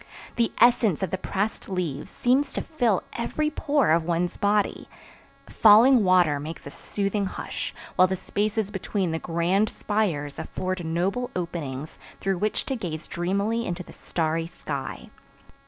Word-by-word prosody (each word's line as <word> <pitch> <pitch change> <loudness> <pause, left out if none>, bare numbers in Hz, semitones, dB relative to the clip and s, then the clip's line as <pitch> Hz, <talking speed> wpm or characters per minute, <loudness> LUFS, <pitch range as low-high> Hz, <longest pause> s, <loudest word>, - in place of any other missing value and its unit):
The 235 -1 +1
essence 230 -7 +4
of 190 - -2
the 190 - 0
pressed 205 +3 -2
leaves 170 -7 -3
seems 260 +4 +1
to - - -2
fill 240 - +1
every 305 +6 -1
pore 285 - +2
of 165 +1 +4
one's 170 +1 0
body. 205 -1 +1 0.6
Falling 225 +3 +7
water 180 -6 +4
makes 155 +3 -7
a 140 - -7
soothing 200 +3 -2
hush, - - -5 0.3
while 185 - +7
the 190 - -1
spaces 205 +2 -1
between 190 -2 -2
the 160 - -1
grand 175 +6 +1
spires 170 -10 -1
afford 185 -1 -3
noble 185 +10 -1
openings 155 -5 -4 0.2
through 195 -2 -1
which 215 +2 -1
to 270 - -2
gaze 170 -8 -5
dreamily 200 +6 -1
into 180 0 -3
the - - -14
starry 165 0 -1
sky. 140 -5 -6
190 Hz, 150 wpm, -26 LUFS, 170-215 Hz, 0.6 s, Falling